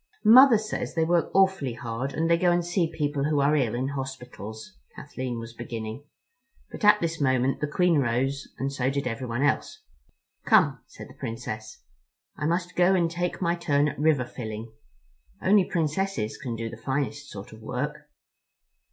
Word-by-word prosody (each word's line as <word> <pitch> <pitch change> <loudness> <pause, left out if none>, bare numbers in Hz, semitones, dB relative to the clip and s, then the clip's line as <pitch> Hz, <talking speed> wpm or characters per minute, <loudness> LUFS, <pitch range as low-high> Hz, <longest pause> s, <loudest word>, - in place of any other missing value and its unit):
"Mother 245 +2 +9
says 215 -3 -4
they 160 -1 +2
work 170 0 +2
awfully 190 -10 +3
hard, 120 +3 -4
and 165 +1 -1
they 170 - +5
go 175 +1 +2
and 175 0 +1
see 175 -2 0
people 145 -2 -1
who 150 -1 +1
are 145 +2 +3
ill 125 -6 +1
in 130 +2 -1
hospitals," 130 - -7 0.2
Kathleen 130 -4 -5
was 115 0 -7
beginning, 115 +1 -6 0.7
but - - -9
at 210 0 +7
this 165 -2 -2
moment 130 0 +1
the 150 - 0
Queen 170 +1 +2
rose 135 +2 0
and 135 +1 -2
so 130 -2 0
did 140 0 -2
everyone 120 +1 -2
else. 430 - 0 0.6
"Come," 165 - +4
said - - -11
the - - -14
Princess, 110 - -6 0.5
"I 150 - -2
must 175 +2 -1
go 180 +2 +4
and 170 -2 +1
take 175 +2 -2
my 170 0 +2
turn 150 -4 +1
at 135 - -8
river 150 -4 +3
filling. 110 -2 -7 0.7
Only 195 -1 +4
Princesses 160 - -1
can 125 -4 -5
do 115 0 -4
the 115 - -8
finest 140 +4 -3
sort 100 +1 -9
of 110 - -13
work." 150 +6 -4
140 Hz, 175 wpm, -26 LUFS, 125-170 Hz, 0.7 s, Mother